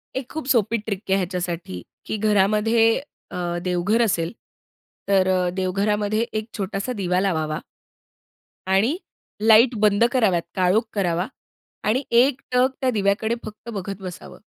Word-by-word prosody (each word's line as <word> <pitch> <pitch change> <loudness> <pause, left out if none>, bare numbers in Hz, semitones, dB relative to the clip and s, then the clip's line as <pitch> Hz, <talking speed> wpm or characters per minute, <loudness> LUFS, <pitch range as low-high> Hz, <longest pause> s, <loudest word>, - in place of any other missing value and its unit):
एक 260 -1 -4
खूप 315 -2 -5
सोपी 230 -3 +2
ट्रिक 205 -3 -4
आहे 190 - +4
ह्याच्यासाठी, 175 - -3 0.2
की 220 - -3
घरामध्ये 215 +2 +3 0.3
अ, 175 -1 -3
देवघर 180 +5 +1
असेल. 170 -7 +1 0.8
तर 195 -2 +3 0.3
देवघरामध्ये 205 +3 0
एक 215 0 -2
छोटासा 195 +4 -3
दिवा 180 -4 0
लावावा 160 -5 -1 1.1
आणि 195 - +2 0.5
लाईट 225 +3 +6
बंद 210 +1 +4
कराव्यात 215 -9 +2
काळोख 185 +4 +3
करावा 180 -2 0 0.6
आणि 250 +6 +2
एकटक 250 +1 +3
त्या 260 - +2
दिव्याकडे 215 +1 +1
फक्त 215 +2 -9
बघत 195 -1 -5
बसावं. 180 -2 -9
205 Hz, 125 wpm, -23 LUFS, 185-225 Hz, 1.1 s, लाईट